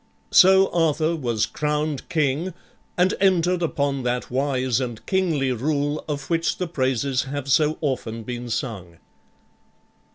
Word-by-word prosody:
So 190 +1 +6
Arthur 165 -1 +1
was 120 -7 0
crowned 150 -1 -2
king 155 +4 0 0.4
and 180 +2 +3
entered 180 -2 +2
upon 140 -4 -1
that 125 0 -2
wise 130 -2 0
and 120 -3 -5
kingly 165 -9 +1
rule 145 +4 -1
of 145 -3 -4
which 165 0 0
the 180 - -2
praises 135 -4 -1
have 140 0 -5
so 150 +2 +3
often 115 -6 -3
been 120 +1 -6
sung. 95 -8 -4
145 Hz, 130 wpm, -23 LUFS, 130-165 Hz, 0.4 s, So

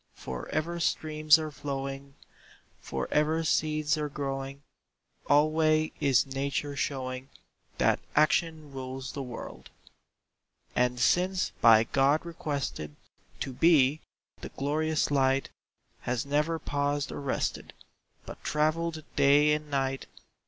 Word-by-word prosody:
For 65 -1 -7
ever 170 +3 -2
streams 155 -2 +3
are 155 -1 -4
flowing, 140 -1 -5 0.6
For - - -4
ever 155 +2 +2
seeds 155 -1 +1
are 150 -1 -2
growing, 135 -1 -5 0.7
Alway 155 +1 +3
is 130 -6 +3
Nature 140 +1 -3
showing 130 -1 -3 0.5
That - - +3 0.2
Action 155 0 +2
rules 130 0 -6
the 140 - -5
world. 125 -3 -8 1.1
And 125 0 +1
since 180 +9 +2
by 110 -1 +7
God 140 +7 +2
requested 140 - -4 0.5
To 135 - -3
be, 150 -1 +4 0.4
the - - -7
glorious 155 +2 -1
light 135 -1 +2 0.5
Has 120 +1 -2
never 150 +3 0
paused 145 -1 -1
or - - -6
rested, 140 - -2 0.5
But - - -10
travelled 155 +1 0
day 145 +2 +5
and 150 0 -3
night. 135 -1 -1
145 Hz, 115 wpm, -29 LUFS, 135-155 Hz, 1.1 s, by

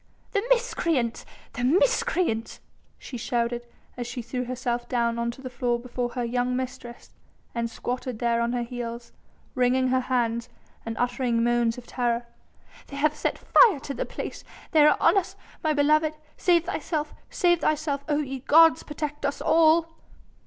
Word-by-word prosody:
"The 405 - +1
miscreants! 335 - 0 0.3
the 245 - -4
miscreants!" 365 - +1 0.4
she 250 - -8
shouted 240 +1 -2 0.3
as 245 -1 -5
she 245 0 -5
threw 250 +2 -3
herself 245 -1 -3
down 235 -2 0
on 235 0 0
to 255 +3 -8
the 255 - -5
floor 240 -1 0
before 245 0 -3
her 245 - -2
young 245 +1 0
mistress 250 -2 -6 0.4
and 235 -1 -2
squatted 250 0 -4
there 235 0 +1
on 235 0 0
her 245 -1 -1
heels, 235 -1 -6 0.4
wringing 255 0 +2
her 260 0 +3
hands 235 -2 -1 0.4
and 225 - -4
uttering 245 -1 0
moans 240 -1 +2
of 245 - -9
terror. 240 -1 -1 0.6
"They 280 - -9
have 300 +1 +2
set 300 - -2
fire 425 - +5
to 280 - -5
the - - -3
palace! - - -6 0.3
They 310 -4 +6
are - - +4
on 360 +4 +5
us, 370 - -8 0.3
my 310 - +2
beloved! 305 +1 +3 0.2
Save 345 -2 +3
thyself! 310 -3 -3 0.2
Save 345 -2 +2
thy 310 - +3
house! 310 - -9 0.2
Oh 295 0 +2
ye 270 -1 -5
gods! 325 +5 +6
protect 295 0 -5
us 280 - -1
all!" 320 +1 +4
255 Hz, 165 wpm, -26 LUFS, 240-305 Hz, 0.6 s, They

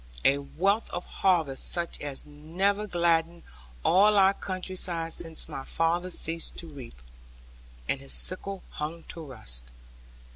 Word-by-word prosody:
A 140 +1 +4
wealth 195 +10 0
of 175 - -5
harvest 165 -8 +1
such 170 -1 -1
as 145 -2 +2
never 180 +8 -1
gladdened 170 -2 +1 0.4
all 205 +3 +5
our 195 0 +6
country 185 -1 -5
side 165 -3 0
since 165 -1 +3
my 135 - -6
father 170 +5 0
ceased 165 -2 -2
to - - -4
reap, 130 - -11 0.9
and 135 - -1
his 135 - +3
sickle 195 +1 +2
hung 160 +2 -5
to 165 - -7
rust. - - -4
165 Hz, 140 wpm, -27 LUFS, 150-185 Hz, 0.9 s, our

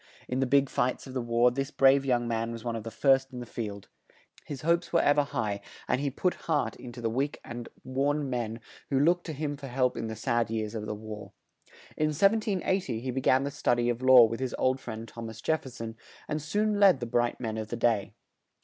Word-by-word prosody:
In 125 - -2
the 135 - +1
big 140 +1 +4
fights 125 0 -1
of 130 - -9
the 130 - -1
war 120 +1 +3
this 135 +2 -2
brave 135 -1 +5
young 120 -3 +1
man 115 0 -1
was 115 -1 -7
one 120 -1 -2
of 115 - -3
the 115 - -6
first 135 +3 +3
in 125 - -7
the 120 - -6
field; 105 -4 -6 0.6
his 140 -4 -6
hopes 170 +2 +1
were 170 - +4
ev 145 +1 +4
er - - +4
high, 110 -8 -2 0.3
and 130 - +1
he 145 - 0
put 180 +7 0 0.2
heart 145 -8 +1
in 125 - -9
to 120 - -8
the 115 - 0
weak 135 +5 -1
and 120 -1 -7
worn 140 +3 0
men 120 -3 -3 0.3
who 135 - +2
looked 175 +5 +2
to 160 - -3
him 145 0 -3
for 140 -1 -8
help 125 0 +1
in 115 - -3
the 110 - -5
sad 120 +1 0
years 110 -1 -2
of 110 -2 -4
the 105 - -3
war. 105 0 -8 0.6
In 155 - +1
1780 190 - +1
he 130 +2 -3
be 130 +2 -2
gan 130 +1 +4
the 140 - -2
stud 120 -3 +1
y 120 0 +1
of 120 0 -1
law 130 -1 +9
with 115 +1 -3
his 130 -2 -2
old 130 +1 +1
friend 115 -2 -7
Thom 115 +1 -7
as 110 0 -10
Jef 160 +6 0
fer 130 - -9
son 115 -2 -7 0.3
and 155 0 -2
soon 205 +7 0
led 195 -9 +6
the 120 - -3
bright 120 0 0
men 110 -3 -3
of 110 - -4
the 120 - -4
day. 115 -4 +1
125 Hz, 250 wpm, -29 LUFS, 115-140 Hz, 0.6 s, law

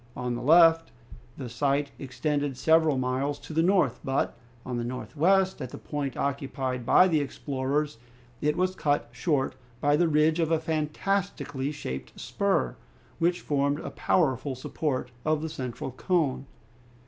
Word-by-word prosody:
On 125 -1 -2
the 120 - -4
left, 165 +3 +6 0.5
the 130 - -5
sight 140 +4 0
extended 140 +1 -2
several 160 0 +4
miles 130 +3 -1
to - - -9
the 160 - +3
north; 175 - +3
but, 135 +1 0 0.3
on 125 -1 -3
the 120 - -2
northwest, 165 +9 +1
at 130 - -4
the - - -8
point 145 -3 -4
occupied 130 -3 -2
by 185 - +7
the 160 -4 +2
explorers, 140 -1 -2 0.4
it 150 0 +1
was 185 +1 +1
cut 145 -8 0
short 130 +2 0 0.3
by 145 +2 +3
the 170 +3 +3
ridge 155 +1 +3
of 165 -2 +1
a 165 -1 +2
fantastically 155 -2 -2
shaped 65 - -6
spur, 60 -2 0 0.4
which 175 +1 +1
formed 140 0 0
a - - -6
powerful 135 -5 +1
support 130 0 -3
of 155 0 +1
the 160 - -2
central 130 -4 -5
cone. 140 -1 0
145 Hz, 150 wpm, -27 LUFS, 130-160 Hz, 0.5 s, by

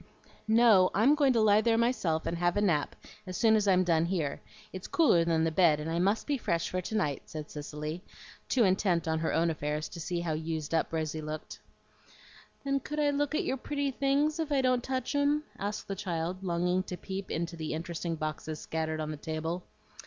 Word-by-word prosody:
"No, 220 -4 +6
I'm 235 +8 +5
going 290 -3 +4
to 230 - +3
lie 210 0 +5
there 225 0 +2
myself 210 -10 +1
and 170 - -1
have 175 +2 +1
a - - +2
nap 165 -8 +1 0.3
as 185 - -4
soon 220 -2 +4
as 210 -1 +1
I'm 185 -1 +4
done 165 -2 +2
here. 170 -6 -2 0.3
It's 185 0 -6
cooler 270 - +4
than 165 -1 +1
the 165 - +1
bed, 160 -3 +4
and 155 +2 -4
I 170 - 0
must 200 +5 +1
be 285 -3 -1
fresh 170 -6 -1
for 185 - -1
to 220 - -5
night," 150 -10 0
said 155 -2 -7
Cicely, 150 +3 -6 0.5
too 250 - +3
intent 185 -4 +2
on 160 0 +1
her 160 - -1
own 165 +1 +2
affairs 150 0 -3
to 175 - -9
see 170 +1 -2
how 165 -2 -1
used 160 -1 -3
up 160 - +1
Rosy 155 -1 -2
looked. 155 0 -6 1.0
"Then 275 0 0
could 300 +3 -5
I 290 -1 +3
look 290 +1 0
at 355 +4 0
your 265 - -1
pretty 285 +1 -2
things 285 +4 +1
if 315 -2 -2
I 275 -2 +3
don't 255 -1 +2
touch 260 0 -2
'em?" 290 +1 +2 0.2
asked 205 +1 -4
the 195 - -3
child, 180 -1 -3
longing 180 +1 +1
to 180 -1 -6
peep 190 +1 -6
into 170 +1 -3
the 155 -2 -4
interesting 170 +1 -4
boxes 155 0 -4
scattered 160 -1 -3
on 155 0 -3
the 155 - -5
table. 160 +4 -4
180 Hz, 215 wpm, -30 LUFS, 160-230 Hz, 1.0 s, No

